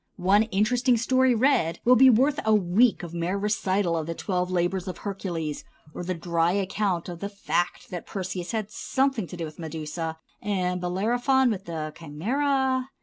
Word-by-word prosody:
One 195 Hz, +3 st, +4 dB
interesting 235 Hz, +4 st, +2 dB
story 255 Hz, +2 st, +3 dB
read 220 Hz, -, +2 dB
will 250 Hz, +1 st, +7 dB
be 265 Hz, +2 st, +7 dB
worth 265 Hz, +5 st, +3 dB
a 220 Hz, 0 st, +4 dB
week 210 Hz, +4 st, +3 dB
of 170 Hz, -1 st, -7 dB
mere 175 Hz, +3 st, -1 dB
recital 200 Hz, -3 st, 0 dB
of 160 Hz, -1 st, -2 dB
the 165 Hz, -, -3 dB
twelve 180 Hz, -2 st, -2 dB
labors 185 Hz, +1 st, -1 dB
of 185 Hz, -, -5 dB
Heracles, 175 Hz, -7 st, -4 dB, 0.3 s
or -, -, -5 dB
the 185 Hz, +1 st, -2 dB
dry 170 Hz, 0 st, 0 dB
account 195 Hz, -2 st, -1 dB
of 175 Hz, -2 st, -7 dB
the 200 Hz, -, -4 dB
fact 180 Hz, -3 st, -2 dB
that 175 Hz, -2 st, -6 dB
Perseus 185 Hz, -2 st, -4 dB
had 215 Hz, -2 st, -3 dB
something 265 Hz, -4 st, 0 dB
to 180 Hz, -, -9 dB
do 165 Hz, -, -3 dB
with 155 Hz, +1 st, -10 dB
Medusa, 160 Hz, 0 st, -5 dB, 0.2 s
and 180 Hz, -3 st, -1 dB
Bellerophon 245 Hz, +8 st, +2 dB
with 195 Hz, -2 st, -4 dB
the 155 Hz, -2 st, -5 dB
Chimæra. 260 Hz, -, 0 dB
190 Hz, 175 wpm, -26 LUFS, 175-230 Hz, 0.3 s, will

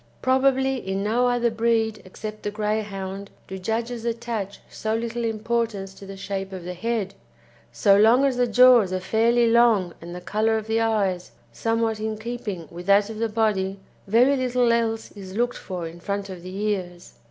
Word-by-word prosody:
Probably 265 Hz, 0 st, +3 dB
in 195 Hz, -3 st, -3 dB
no 235 Hz, +4 st, +2 dB
other 240 Hz, -1 st, +1 dB
breed, 225 Hz, -1 st, +1 dB
except 215 Hz, +3 st, -8 dB
the 205 Hz, -, -2 dB
Greyhound, 205 Hz, -2 st, -3 dB, 0.2 s
do 190 Hz, 0 st, -6 dB
judges 230 Hz, +4 st, -3 dB
attach 230 Hz, -4 st, -3 dB
so 220 Hz, 0 st, -3 dB
little 235 Hz, +1 st, -3 dB
importance 225 Hz, -3 st, -2 dB
to 195 Hz, 0 st, -12 dB
the 195 Hz, 0 st, -8 dB
shape 195 Hz, 0 st, -4 dB
of 185 Hz, -2 st, -7 dB
the 180 Hz, +1 st, -5 dB
head; 210 Hz, 0 st, -2 dB, 0.6 s
so 120 Hz, +12 st, +4 dB
long 235 Hz, +6 st, +5 dB
as 270 Hz, -2 st, +1 dB
the 245 Hz, 0 st, +2 dB
jaws 240 Hz, -4 st, +6 dB
are 185 Hz, -, -1 dB
fairly 230 Hz, +4 st, +2 dB
long 225 Hz, -7 st, +4 dB
and 170 Hz, +1 st, -8 dB
the -, -, -5 dB
colour 215 Hz, +5 st, 0 dB
of 215 Hz, -, -4 dB
the 220 Hz, +1 st, 0 dB
eyes 200 Hz, -5 st, 0 dB, 0.2 s
somewhat 225 Hz, -, -1 dB
in 215 Hz, 0 st, -3 dB
keeping 220 Hz, -7 st, -5 dB
with 175 Hz, +2 st, -9 dB
that 200 Hz, +2 st, +4 dB
of 215 Hz, -, -7 dB
the 230 Hz, 0 st, 0 dB
body, 200 Hz, -3 st, 0 dB, 0.3 s
very 245 Hz, +7 st, +4 dB
little 250 Hz, -2 st, +2 dB
else 225 Hz, -1 st, -1 dB
is 190 Hz, -2 st, -10 dB
looked 245 Hz, +1 st, 0 dB
for 180 Hz, -3 st, -5 dB
in 165 Hz, +1 st, -10 dB
front 200 Hz, +2 st, -3 dB
of 185 Hz, -2 st, -8 dB
the 185 Hz, +2 st, -8 dB
ears. 185 Hz, -4 st, -3 dB
215 Hz, 185 wpm, -24 LUFS, 195-235 Hz, 0.6 s, jaws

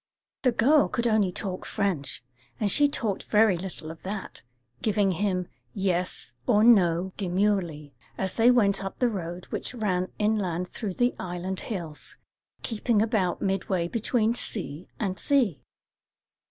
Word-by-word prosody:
The 255 Hz, -, +3 dB
girl 285 Hz, +6 st, +4 dB
could 235 Hz, -1 st, -2 dB
only 215 Hz, -5 st, +3 dB
talk 185 Hz, 0 st, -4 dB
French, 185 Hz, -, -2 dB, 0.4 s
and 205 Hz, -3 st, +1 dB
she 290 Hz, +7 st, +5 dB
talked 225 Hz, -8 st, -2 dB
very 215 Hz, -2 st, +4 dB
little 170 Hz, -3 st, -6 dB
of 160 Hz, -, -12 dB
that, 195 Hz, +1 st, -6 dB, 0.4 s
giving 205 Hz, -2 st, +2 dB
him 185 Hz, -1 st, 0 dB, 0.3 s
"yes" 180 Hz, -, -1 dB
or 210 Hz, +1 st, +5 dB
"no" 185 Hz, -5 st, +4 dB
demurely, 180 Hz, -6 st, 0 dB, 0.2 s
as 190 Hz, -1 st, -1 dB
they 230 Hz, +1 st, +5 dB
went 200 Hz, -6 st, +4 dB
up 195 Hz, -, -5 dB
the 250 Hz, -, +3 dB
road 175 Hz, -4 st, -5 dB
which -, -, -4 dB
ran 185 Hz, -5 st, -1 dB
inland 190 Hz, -5 st, 0 dB
through 200 Hz, -6 st, -4 dB
the 245 Hz, 0 st, +2 dB
island 185 Hz, +1 st, -4 dB
hills, 170 Hz, -8 st, -6 dB, 0.5 s
keeping 225 Hz, -1 st, +1 dB
about 210 Hz, -5 st, +1 dB
midway 190 Hz, -2 st, 0 dB
between 230 Hz, +2 st, +1 dB
sea 180 Hz, -9 st, -4 dB
and 190 Hz, -4 st, -2 dB
sea. 245 Hz, -, +2 dB
195 Hz, 140 wpm, -27 LUFS, 180-220 Hz, 0.5 s, she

